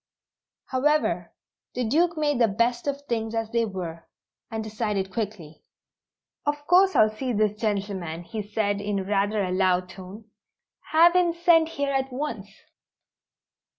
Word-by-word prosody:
However, 300 Hz, +4 st, +1 dB, 0.4 s
the 250 Hz, -, -1 dB
Duke 335 Hz, +7 st, +2 dB
made 295 Hz, -4 st, +1 dB
the 230 Hz, -, +5 dB
best 235 Hz, +5 st, 0 dB
of 280 Hz, 0 st, -2 dB
things 230 Hz, -4 st, -3 dB
as 225 Hz, -1 st, -2 dB
they 235 Hz, -1 st, +2 dB
were, 175 Hz, -5 st, -6 dB, 0.4 s
and 220 Hz, 0 st, -4 dB
decided 210 Hz, -3 st, -3 dB
quickly. 200 Hz, -8 st, -5 dB, 0.8 s
"Of 290 Hz, 0 st, -2 dB
course 375 Hz, +3 st, +5 dB
I'll 215 Hz, 0 st, +5 dB
see 255 Hz, +2 st, -2 dB
this 210 Hz, 0 st, 0 dB
gentleman," 195 Hz, -6 st, -2 dB
he 215 Hz, +4 st, -5 dB
said 205 Hz, -1 st, -1 dB
in 200 Hz, -2 st, -2 dB
rather 205 Hz, +1 st, +1 dB
a 185 Hz, -, -2 dB
loud 185 Hz, -1 st, +1 dB
tone. 190 Hz, +4 st, -11 dB, 0.7 s
"Have 340 Hz, +3 st, +6 dB
him 355 Hz, -2 st, +3 dB
sent 335 Hz, -1 st, +4 dB
here 280 Hz, -3 st, -2 dB
at 270 Hz, 0 st, -1 dB
once." 250 Hz, -7 st, -4 dB
220 Hz, 145 wpm, -25 LUFS, 200-285 Hz, 0.8 s, Have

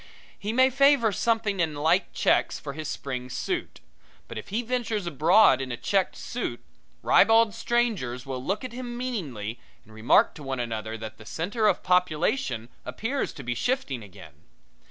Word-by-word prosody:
He 210 Hz, +1 st, -3 dB
may 260 Hz, +3 st, +4 dB
favor 275 Hz, -4 st, +4 dB
something 220 Hz, -1 st, 0 dB
in 160 Hz, -3 st, 0 dB
light 160 Hz, +6 st, +2 dB
checks -, -, +1 dB
for 140 Hz, -, -6 dB
his 155 Hz, +1 st, -6 dB
spring 125 Hz, -2 st, -5 dB
suit; 355 Hz, -, -4 dB, 0.5 s
but -, -, -8 dB
if -, -, -7 dB
he 220 Hz, +5 st, -2 dB
ventures 230 Hz, -4 st, -2 dB
abroad 170 Hz, +3 st, +5 dB
in 130 Hz, -1 st, -4 dB
a 120 Hz, -, -3 dB
checked 195 Hz, +6 st, 0 dB
suit, -, -, -5 dB, 0.4 s
ribald 225 Hz, -1 st, +5 dB
strangers 225 Hz, -, -1 dB
will 130 Hz, -2 st, -5 dB
look 195 Hz, -, -2 dB
at 255 Hz, -2 st, -6 dB
him 240 Hz, -1 st, -6 dB
meaningly 140 Hz, -, -4 dB, 0.3 s
and 110 Hz, -, -17 dB
remark 110 Hz, +2 st, +4 dB
to 155 Hz, -, -12 dB
one 135 Hz, -2 st, -3 dB
another 110 Hz, -2 st, -4 dB
that 110 Hz, 0 st, -8 dB
the 105 Hz, -, -12 dB
center 205 Hz, -, 0 dB
of -, -, +1 dB
population 170 Hz, -, +1 dB
appears 225 Hz, -, -3 dB
to 140 Hz, -, -9 dB
be 120 Hz, 0 st, -2 dB
shifting 135 Hz, -, -1 dB
again. 100 Hz, -7 st, -13 dB
175 Hz, 170 wpm, -26 LUFS, -, 0.5 s, abroad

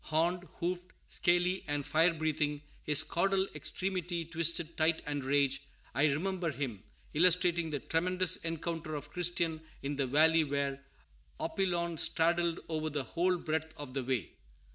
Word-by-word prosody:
Horned, 170 Hz, +3 st, +1 dB
hoofed, 180 Hz, +1 st, -3 dB
scaly, 175 Hz, +2 st, +1 dB
and 145 Hz, -1 st, -1 dB
fire 160 Hz, +4 st, +4 dB
breathing, 150 Hz, -2 st, -1 dB, 0.2 s
his 150 Hz, +1 st, +5 dB
caudal 190 Hz, +4 st, +1 dB
extremity 180 Hz, -3 st, -3 dB
twisted 165 Hz, 0 st, 0 dB
tight 160 Hz, +1 st, +2 dB
with 145 Hz, -2 st, -2 dB
rage, 140 Hz, 0 st, +2 dB, 0.3 s
I 140 Hz, -, +3 dB
remember 175 Hz, +4 st, 0 dB
him, 130 Hz, -8 st, -4 dB, 0.3 s
illustrating 175 Hz, 0 st, +4 dB
the 150 Hz, -, -1 dB
tremendous 180 Hz, +2 st, +2 dB
encounter 165 Hz, -1 st, -4 dB
of 145 Hz, 0 st, -7 dB
Christian 170 Hz, -2 st, 0 dB, 0.2 s
in 140 Hz, +1 st, -3 dB
the 135 Hz, -2 st, 0 dB
valley 160 Hz, +4 st, +5 dB
where 140 Hz, -1 st, -2 dB, 0.6 s
"Apollyon 170 Hz, -4 st, -1 dB
straddled 170 Hz, +1 st, +2 dB
over 155 Hz, -1 st, -2 dB
the 145 Hz, -2 st, -2 dB
whole 180 Hz, +5 st, +1 dB
breadth 160 Hz, -1 st, -3 dB
of 145 Hz, -3 st, -7 dB
the 135 Hz, -1 st, -2 dB
way." 125 Hz, -6 st, -1 dB
160 Hz, 140 wpm, -32 LUFS, 145-175 Hz, 0.6 s, his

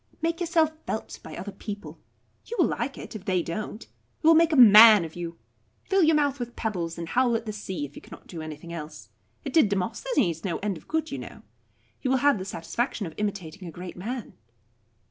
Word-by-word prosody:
Make 330 Hz, +1 st, -1 dB
yourself 330 Hz, -2 st, +2 dB, 0.2 s
felt 220 Hz, -, -4 dB
by -, -, -9 dB
other 205 Hz, -, -6 dB
people. 205 Hz, +1 st, -8 dB, 0.5 s
You 475 Hz, -, -6 dB
will -, -, +5 dB
like -, -, -2 dB
it, -, -, -9 dB
if 205 Hz, -2 st, -8 dB
they 185 Hz, -4 st, +1 dB
don't. 210 Hz, +6 st, -5 dB
It -, -, -22 dB, 0.4 s
will 325 Hz, +1 st, +7 dB
make 330 Hz, 0 st, +5 dB
a -, -, +2 dB
man 215 Hz, -, +9 dB
of 160 Hz, -, -10 dB
you. 170 Hz, -1 st, -6 dB, 0.5 s
Fill 390 Hz, -1 st, +2 dB
your 320 Hz, -1 st, +5 dB
mouth 285 Hz, -2 st, +1 dB
with 240 Hz, -1 st, -5 dB
pebbles, 175 Hz, -7 st, -3 dB
and 170 Hz, -1 st, -5 dB
howl 245 Hz, +1 st, +2 dB
at 230 Hz, 0 st, -2 dB
the 215 Hz, -, -4 dB
sea, 190 Hz, -7 st, -4 dB
if 145 Hz, -, -13 dB
you -, -, -9 dB
cannot -, -, -13 dB
do 165 Hz, -3 st, -8 dB
anything 155 Hz, +2 st, -8 dB
else. 150 Hz, -, -8 dB, 0.4 s
It 275 Hz, -, -4 dB
did 310 Hz, -11 st, +5 dB
Demosthenes 200 Hz, -, -1 dB
no 180 Hz, -4 st, -1 dB
end 200 Hz, -1 st, -2 dB
of 160 Hz, -, -13 dB
good, 320 Hz, 0 st, -1 dB
you -, -, -4 dB
know. -, -, -10 dB, 0.6 s
You 260 Hz, -, -1 dB
will 265 Hz, -, +3 dB
have 280 Hz, -4 st, +3 dB
the 185 Hz, -, -5 dB
satisfaction 200 Hz, +5 st, -3 dB
of 165 Hz, -, -7 dB
imitating 195 Hz, -4 st, -4 dB
a -, -, -7 dB
great 180 Hz, +2 st, -8 dB
man." 230 Hz, +5 st, -5 dB
210 Hz, 220 wpm, -26 LUFS, 175-265 Hz, 0.6 s, man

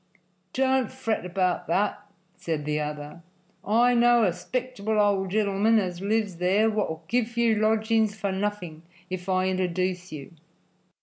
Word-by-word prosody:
"Don't 265 Hz, -2 st, +1 dB
fret 225 Hz, -8 st, -2 dB
about 180 Hz, 0 st, -1 dB
that," 205 Hz, +4 st, 0 dB, 0.3 s
said 160 Hz, -5 st, -4 dB
the 150 Hz, 0 st, -1 dB
other. 150 Hz, +2 st, -6 dB, 0.4 s
"I 235 Hz, +4 st, +3 dB
know 240 Hz, -1 st, +5 dB
a 190 Hz, -, +3 dB
'spectable 220 Hz, +2 st, -3 dB
old 200 Hz, -2 st, +2 dB
genelman 210 Hz, +2 st, +2 dB
as 180 Hz, -3 st, -2 dB
lives 205 Hz, -2 st, -1 dB
there 195 Hz, +5 st, +2 dB
wot'll 170 Hz, -7 st, -2 dB
give 235 Hz, 0 st, -1 dB
you 235 Hz, -1 st, +3 dB
lodgings 220 Hz, 0 st, +1 dB
for 200 Hz, -2 st, -2 dB
nothing 190 Hz, -5 st, -3 dB, 0.3 s
if 185 Hz, 0 st, -5 dB
I 185 Hz, 0 st, +2 dB
interduce 185 Hz, 0 st, -1 dB
you." 150 Hz, +1 st, -9 dB
200 Hz, 140 wpm, -26 LUFS, 180-220 Hz, 0.4 s, know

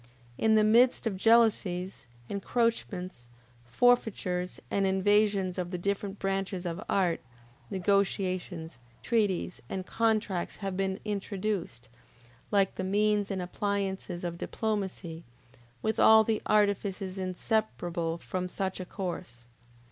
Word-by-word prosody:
In 220 Hz, -, +3 dB
the 215 Hz, -, +5 dB
midst 240 Hz, +5 st, +4 dB
of 220 Hz, -4 st, 0 dB
jealousies, 195 Hz, -, +2 dB, 0.2 s
encroachments, 200 Hz, -, -2 dB, 0.4 s
forfeitures, 185 Hz, -, +1 dB
and 195 Hz, -1 st, +2 dB
invasions 195 Hz, -1 st, +2 dB
of 175 Hz, -1 st, -2 dB
the 180 Hz, -, -3 dB
different 200 Hz, +2 st, -2 dB
branches 195 Hz, -1 st, -2 dB
of 175 Hz, +4 st, -3 dB
art, 180 Hz, -4 st, +2 dB, 0.5 s
negotiations, 185 Hz, -, -1 dB, 0.2 s
treaties, 205 Hz, -6 st, 0 dB
and 190 Hz, -1 st, -4 dB
contracts 215 Hz, -5 st, 0 dB
have 195 Hz, -2 st, -4 dB
been 190 Hz, +1 st, -1 dB
introduced, 200 Hz, -, -3 dB, 0.6 s
like 200 Hz, -2 st, +3 dB
the 190 Hz, -, -2 dB
means 205 Hz, +1 st, +2 dB
and 190 Hz, -3 st, -2 dB
appliances 190 Hz, -1 st, -2 dB
of 170 Hz, -1 st, -4 dB
diplomacy, 190 Hz, -6 st, -3 dB, 0.6 s
with 220 Hz, +1 st, 0 dB
all 220 Hz, 0 st, +8 dB
the 220 Hz, 0 st, 0 dB
artifices 200 Hz, -2 st, +1 dB
inseparable 180 Hz, -3 st, -1 dB
from 180 Hz, +1 st, -4 dB
such 190 Hz, +1 st, -3 dB
a 185 Hz, -, -4 dB
course. 175 Hz, -11 st, -6 dB
195 Hz, 115 wpm, -29 LUFS, 180-210 Hz, 0.6 s, all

